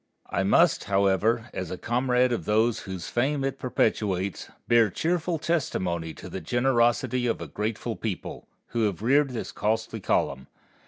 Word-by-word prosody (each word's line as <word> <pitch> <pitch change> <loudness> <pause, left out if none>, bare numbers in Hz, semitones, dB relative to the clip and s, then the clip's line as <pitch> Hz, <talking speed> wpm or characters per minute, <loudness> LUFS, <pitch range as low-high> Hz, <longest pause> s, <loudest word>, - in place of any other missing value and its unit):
I 95 - +1
must, 140 - +3
however, 100 +4 +2
as 90 -3 -4
a 90 - -5
comrade 125 +2 +1
of 120 - -2
those 110 +2 +2
whose 95 -3 -6
fame 135 +3 0
it 135 0 -2
perpetuates, 100 -6 -1 0.2
bear 115 -2 +5
cheerful 165 - -1
testimony 90 - -1
to - - -10
the - - -6
generosity 120 0 +2
of 115 - 0
a - - -5
grateful 110 +2 -3
people, 95 -2 -5 0.2
who 115 -2 0
have 100 -1 -2
reared 140 +4 +4
this 120 -3 -5
costly 110 +1 -1
column. 70 -8 0
115 Hz, 155 wpm, -26 LUFS, 100-125 Hz, 0.2 s, bear